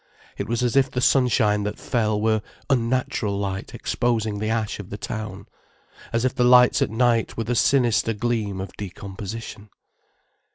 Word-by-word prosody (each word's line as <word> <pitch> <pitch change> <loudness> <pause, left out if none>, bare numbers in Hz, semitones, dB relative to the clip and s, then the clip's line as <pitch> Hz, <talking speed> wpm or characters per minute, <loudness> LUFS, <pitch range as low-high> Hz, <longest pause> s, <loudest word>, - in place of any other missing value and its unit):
It - - -4
was 120 +1 -1
as 120 0 0
if 135 -1 +4
the 125 - -3
sunshine 125 -5 +3
that 105 0 -3
fell 110 -3 0
were 110 0 +1 0.3
unnatural 120 -4 0
light 100 -1 -4
exposing 110 -4 -1
the 110 +1 -2
ash 110 -2 -1
of 100 - -8
the 105 - -6
town, 105 -2 -6 0.7
as 115 +2 0
if 130 - +1
the 130 -2 +1
lights 125 0 +6
at - - +2
night 115 0 +1
were 115 - -1
the 120 +2 -1
sinister 120 -2 +2
gleam 105 -3 -2
of 95 -1 -6
decomposition. 100 +2 -7
110 Hz, 165 wpm, -23 LUFS, 105-120 Hz, 0.7 s, lights